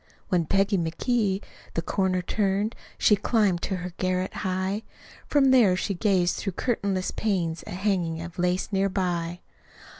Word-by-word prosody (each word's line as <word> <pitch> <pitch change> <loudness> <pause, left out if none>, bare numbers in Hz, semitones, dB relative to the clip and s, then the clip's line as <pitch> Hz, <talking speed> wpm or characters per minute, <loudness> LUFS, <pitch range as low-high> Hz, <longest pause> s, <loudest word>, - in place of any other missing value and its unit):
When 175 -4 +1
Peggy 195 0 +2
McGee 195 +4 0 0.3
the 165 - 0
corner 185 0 0
turned, 200 +2 0 0.2
SHE 210 - +4
climbed 205 -4 +2
to 190 - -2
her 180 -1 -5
garret 185 0 -1
high 190 +2 -1 0.5
From 275 -2 +4
there 225 -8 +6
she 200 +2 -1
gazed 185 -2 +2
through 195 - -3
curtainless 200 -4 -1
panes 175 -6 -1
At - - -6
hangin's 180 -4 0
of 170 +1 -10
lace 180 +3 0
near 195 0 +2
by. 175 -2 -2
190 Hz, 150 wpm, -26 LUFS, 180-205 Hz, 0.5 s, there